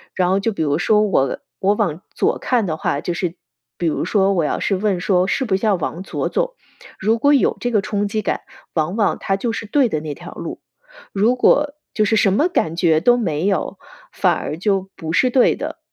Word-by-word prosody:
然 180 -1 +1
后 195 - +2
就 225 +3 0
比 200 - -2
如 145 0 0
说 210 +3 +3
我 135 -10 +1 0.2
我 200 +2 +2
往 185 -6 -1
左 - - +1
看 240 -4 +1
的 160 -4 -2
话， 140 - -1
就 175 - -3
是 175 -1 -3 0.4
比 175 - -2
如 160 - 0
说 195 +1 +2
我 175 -4 +1
要 - - -1
是 195 - 0
问 195 -1 0
说 180 0 +2
是 265 - 0
不 200 -5 +1
是 190 - -4
要 215 -3 +3
往 175 0 -4
左 190 - -3
走， - - -1 0.4
如 220 +3 +1
果 285 +4 +4
有 275 - +2
这 245 - -1
个 215 -4 +1
冲 205 0 -1
击 215 +1 -2
感， - - -1 0.3
往 160 +3 -1
往 220 -2 +1
它 195 - -1
就 230 +4 -2
是 225 -1 -5
对 270 +3 +3
的 155 -9 -2
那 150 -1 -6
条 - - -10
路， - - -7 0.5
如 215 +5 +3
果 290 +3 +3 0.2
就 215 - +2
是 220 - +2
什 200 -3 +3
么 300 - +2
感 165 - 0
觉 170 -3 +3
都 240 +8 +4
没 170 -8 -1
有， 195 -5 -1 0.3
反 - - +2
而 155 - -4
就 195 0 0
不 160 0 -5
是 255 - +3
对 250 0 +4
的。 - - -6
195 Hz, 250 characters per minute, -20 LUFS, 175-225 Hz, 0.5 s, 果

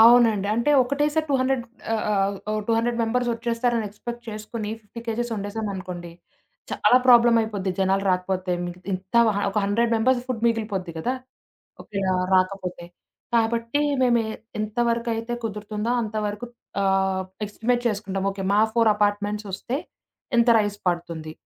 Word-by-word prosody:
అవునండి. 225 -3 +6
అంటే 235 +6 +1
ఒకటే 280 +4 0
సారి 315 -1 +1
టూ - - +3
హండ్రెడ్ 260 -2 +1 0.3
ఆహ్, 220 - 0
ఆహ్, 200 -1 +1
ఓ - - 0
200 230 +1 +1
మెంబర్సొచ్చేస్తారని 235 -1 0
ఎక్స్‌పెక్ట్ 240 +4 -8
చేసుకొని 215 0 -5
50 220 +3 -10
కేజీస్ 235 +1 -2
వండేసాం 210 +1 -4
అనుకోండి. 180 -2 -7 0.6
చాలా 250 - +4
ప్రాబ్లమయిపోద్ది 225 -5 +5
జనాలు 195 +1 +2
రాకపోతే 185 0 -1
మీకు 175 +1 -7
ఇంత 185 +2 -6 0.4
ఒక 210 - -11
100 230 +4 +1
మెంబర్స్ 245 +2 +3
ఫుడ్ 245 -3 -3
మిగిలిపోద్ది 210 -6 -1
గదా! 250 +10 -1 0.7
ఓకే, 200 - -6 0.4
రాకపోతే 185 -2 0 0.5
కాబట్టి 230 +4 +1 0.2
మేము 240 -2 +4
ఎ - - -4 0.3
ఎంతవరకయితే 230 +1 -1
కుదురుతుందో 210 +1 -3
అంతవరకు 215 +1 -3 0.4
ఆహ్, 190 -1 +1 0.2
ఎస్టిమేట్ 240 +4 -1
చేసుకుంటాం 195 -3 -3
ఓకే 195 0 -6
మా 205 - +4
4 230 -2 +5
అపార్ట్మెంట్సొస్తే 205 +2 -1 0.6
ఇంత 235 +1 +4
రైస్ 205 -1 -1
పడుతుంది. 170 -3 -3
215 Hz, 130 wpm, -24 LUFS, 195-235 Hz, 0.7 s, అవునండి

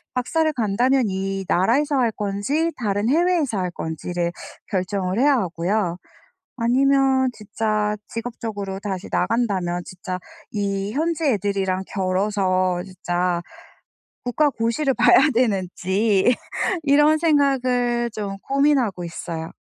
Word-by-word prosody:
박사를 315 +6 +1
간다면 250 +3 +2
이 195 0 -3
나라에서 275 +11 +2
할 240 -3 +2
건지 210 +12 -1
다른 205 -2 -1
해외에서 325 - +2
할 180 -1 -1
건지를 170 +1 -3 0.4
결정을 190 0 -1
해야 285 +2 +5
하고요. 180 -2 -1 0.6
아니면 265 +2 +3
진짜 210 0 -1
직업적으로 220 -4 -5
다시 195 -3 -4
나간다면 190 -7 0
진짜 185 0 -6 0.3
이 200 -1 -2
현지 320 +3 -1
애들이랑 195 -5 0
겨뤄서 185 -2 0
진짜 180 -2 -2 0.8
국가 290 +5 +2
고시를 235 +4 0
봐야 - - +6 0.2
되는지 200 0 +2 0.5
이런 295 +2 +5
생각을 255 -6 +2
좀 200 -2 -4
고민하고 275 -9 +1
있어요. 165 -1 -6
210 Hz, 260 characters per minute, -22 LUFS, 190-260 Hz, 0.8 s, 봐야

